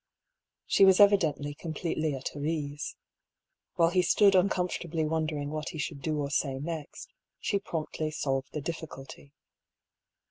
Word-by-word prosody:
She -, -, +4 dB
was 190 Hz, -1 st, +7 dB
evidently 160 Hz, -8 st, +4 dB
completely 155 Hz, -1 st, -2 dB
at 135 Hz, -, -4 dB
her 145 Hz, -, -7 dB
ease. 150 Hz, -2 st, -3 dB, 0.8 s
"While 165 Hz, 0 st, +4 dB
he 180 Hz, 0 st, +4 dB
stood 195 Hz, +3 st, +5 dB
uncomfortably 180 Hz, -3 st, +1 dB
wondering 155 Hz, -2 st, -1 dB
what 155 Hz, 0 st, -3 dB
he -, -, -7 dB
should 145 Hz, -1 st, -4 dB
do 155 Hz, 0 st, -1 dB
or 140 Hz, -1 st, -2 dB
say 135 Hz, -2 st, 0 dB
next, 165 Hz, -, -6 dB, 0.3 s
she 200 Hz, -, 0 dB
promptly 155 Hz, -4 st, -3 dB
solved 135 Hz, -3 st, -2 dB
the 150 Hz, -, -4 dB
difficulty. 140 Hz, -3 st, -7 dB
155 Hz, 140 wpm, -29 LUFS, 145-170 Hz, 0.8 s, was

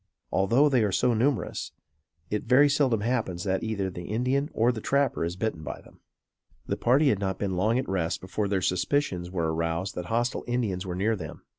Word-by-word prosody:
Although 115 Hz, +10 st, +4 dB
they 130 Hz, -5 st, +3 dB
are 105 Hz, -, +1 dB
so 120 Hz, +5 st, +2 dB
numerous, 115 Hz, -2 st, -1 dB, 0.6 s
it 105 Hz, -, -1 dB
very 135 Hz, +3 st, +6 dB
seldom 135 Hz, -6 st, +2 dB
happens 110 Hz, -7 st, -1 dB
that 95 Hz, -1 st, 0 dB
either 105 Hz, -4 st, -1 dB
the 90 Hz, 0 st, -7 dB
Indian 130 Hz, -, 0 dB
or 115 Hz, +2 st, +2 dB
the 110 Hz, -3 st, -6 dB
trapper 140 Hz, -4 st, +1 dB
is 85 Hz, +1 st, -2 dB
bitten 95 Hz, -4 st, -2 dB
by -, -, -6 dB
them. -, -, -19 dB, 0.7 s
The -, -, -1 dB
party 135 Hz, +5 st, +3 dB
had 105 Hz, -, +1 dB
not 95 Hz, -2 st, -2 dB
been 95 Hz, -2 st, -2 dB
long 110 Hz, +6 st, +2 dB
at 130 Hz, -, -1 dB
rest 90 Hz, -4 st, -1 dB
before 100 Hz, +2 st, -2 dB
their 95 Hz, -2 st, 0 dB
suspicions 90 Hz, -2 st, 0 dB
were 85 Hz, -3 st, -1 dB
aroused 85 Hz, +3 st, -2 dB
that 90 Hz, -, -5 dB
hostile 120 Hz, +5 st, -1 dB
Indians 105 Hz, -7 st, -1 dB
were 90 Hz, -, -3 dB
near 105 Hz, +5 st, +1 dB
them. 80 Hz, -7 st, -8 dB
105 Hz, 200 wpm, -27 LUFS, 90-125 Hz, 0.7 s, very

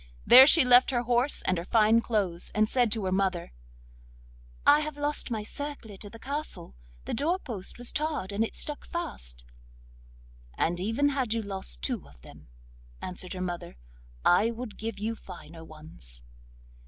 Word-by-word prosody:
There 260 Hz, +2 st, +10 dB
she 315 Hz, -2 st, +7 dB
left 250 Hz, 0 st, +6 dB
her 245 Hz, -2 st, 0 dB
horse 245 Hz, +3 st, +1 dB
and 185 Hz, -2 st, +1 dB
her -, -, -5 dB
fine 220 Hz, +3 st, +4 dB
clothes, 200 Hz, -7 st, -1 dB
and 215 Hz, 0 st, +3 dB
said 245 Hz, -1 st, +1 dB
to 215 Hz, -3 st, 0 dB
her 185 Hz, -, -1 dB
mother: 185 Hz, -, -1 dB, 1.1 s
'I 290 Hz, +1 st, +7 dB
have 305 Hz, -1 st, -4 dB
lost 290 Hz, -1 st, -1 dB
my 220 Hz, -3 st, -3 dB
circlet 230 Hz, -5 st, -6 dB
at 205 Hz, -, -10 dB
the 230 Hz, -, -11 dB
castle; 280 Hz, -, -5 dB, 0.3 s
the -, -, -4 dB
door 315 Hz, +9 st, +1 dB
post 220 Hz, -, -5 dB
was 245 Hz, 0 st, -1 dB
tarred, 300 Hz, -10 st, -2 dB
and 205 Hz, +2 st, 0 dB
it 225 Hz, -, -4 dB
stuck 295 Hz, -1 st, -2 dB
fast.' -, -, -5 dB, 1.1 s
'And 175 Hz, +1 st, 0 dB
even 225 Hz, +9 st, +1 dB
had 260 Hz, -5 st, -1 dB
you 225 Hz, -, -2 dB
lost 190 Hz, -, -3 dB
two 70 Hz, -, -3 dB
of 70 Hz, -3 st, -20 dB
them,' -, -, -15 dB, 0.5 s
answered 180 Hz, 0 st, -5 dB
her 185 Hz, -, -5 dB
mother, 175 Hz, -, -5 dB, 0.5 s
'I 200 Hz, +6 st, +5 dB
would 235 Hz, -1 st, -7 dB
give 225 Hz, -1 st, -4 dB
you 220 Hz, +3 st, -3 dB
finer 170 Hz, -5 st, -11 dB
ones. 155 Hz, -, -11 dB
220 Hz, 170 wpm, -28 LUFS, 185-255 Hz, 1.1 s, There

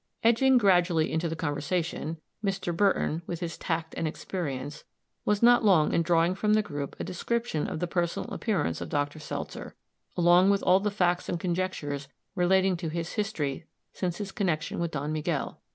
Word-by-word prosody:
Edging 250 Hz, +3 st, +5 dB
gradually 175 Hz, -6 st, +3 dB
into 160 Hz, +1 st, 0 dB
the 165 Hz, -, -3 dB
conversation, 160 Hz, +1 st, -2 dB, 0.3 s
Mr. 195 Hz, -4 st, -1 dB
Burton, 180 Hz, -4 st, +2 dB
with 170 Hz, -, -4 dB
his 170 Hz, -2 st, -4 dB
tact 165 Hz, -1 st, -3 dB
and 165 Hz, -, -1 dB
experience, 150 Hz, -4 st, -5 dB, 0.4 s
was 210 Hz, +1 st, +1 dB
not 240 Hz, 0 st, +6 dB
long 180 Hz, -8 st, +4 dB
in -, -, +3 dB
drawing 170 Hz, +1 st, +3 dB
from 210 Hz, +2 st, +1 dB
the 215 Hz, -, +3 dB
group 145 Hz, -7 st, -5 dB
a -, -, -2 dB
description 230 Hz, -2 st, -2 dB
of -, -, -4 dB
the 175 Hz, -, 0 dB
personal 170 Hz, -1 st, -2 dB
appearance 205 Hz, -9 st, -1 dB
of -, -, -5 dB
Dr. 145 Hz, +1 st, -1 dB
Seltzer, 150 Hz, -, -6 dB, 0.4 s
along 175 Hz, +2 st, +5 dB
with 200 Hz, 0 st, +2 dB
all 185 Hz, +1 st, +5 dB
the 210 Hz, +1 st, 0 dB
facts 180 Hz, -3 st, 0 dB
and 175 Hz, -, -1 dB
conjectures 170 Hz, -6 st, -2 dB, 0.3 s
relating 190 Hz, 0 st, +3 dB
to 165 Hz, -2 st, -4 dB
his 165 Hz, +1 st, -3 dB
history 165 Hz, -9 st, -2 dB, 0.3 s
since 175 Hz, -2 st, -2 dB
his 205 Hz, -2 st, -5 dB
connection 175 Hz, -8 st, -1 dB
with 170 Hz, 0 st, 0 dB
Don 150 Hz, 0 st, -3 dB
Miguel. 155 Hz, -1 st, -2 dB
175 Hz, 175 wpm, -28 LUFS, 155-195 Hz, 0.4 s, not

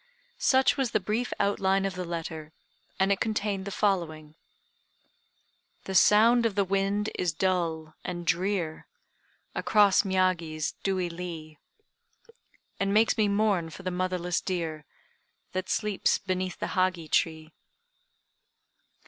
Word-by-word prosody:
Such 265 Hz, +2 st, +3 dB
was 265 Hz, -5 st, -1 dB
the -, -, +3 dB
brief 215 Hz, +5 st, -2 dB
outline 195 Hz, -1 st, +1 dB
of 195 Hz, -, -2 dB
the 180 Hz, 0 st, -5 dB
letter, 160 Hz, -2 st, -5 dB, 0.5 s
and 190 Hz, +1 st, +3 dB
it 195 Hz, -, +1 dB
contained 210 Hz, -3 st, -1 dB
the -, -, -4 dB
following: 165 Hz, -7 st, -1 dB, 1.5 s
"The 190 Hz, -, -5 dB
sound 225 Hz, +5 st, +6 dB
of 225 Hz, -4 st, 0 dB
the 200 Hz, -, +3 dB
wind 195 Hz, +2 st, 0 dB
is 180 Hz, -2 st, 0 dB
dull 165 Hz, -3 st, -1 dB
and 175 Hz, -1 st, -5 dB
drear 175 Hz, -2 st, -1 dB, 0.7 s
Across 205 Hz, -3 st, +4 dB
Miyagi's 185 Hz, -5 st, 0 dB
dewy 190 Hz, -2 st, 0 dB
lea, 165 Hz, -3 st, -7 dB, 1.2 s
And 195 Hz, 0 st, 0 dB
makes 215 Hz, +2 st, +4 dB
me 215 Hz, -2 st, +2 dB
mourn 200 Hz, -5 st, +1 dB
for 190 Hz, -, -11 dB
the 185 Hz, -, -2 dB
motherless 180 Hz, -1 st, -1 dB
deer 165 Hz, -5 st, -3 dB, 0.7 s
That 185 Hz, 0 st, -3 dB
sleeps 210 Hz, -3 st, +1 dB
beneath 185 Hz, -2 st, -3 dB
the -, -, -4 dB
Hagi 185 Hz, -3 st, 0 dB
tree." 160 Hz, 0 st, 0 dB
185 Hz, 125 wpm, -28 LUFS, 170-200 Hz, 1.5 s, sound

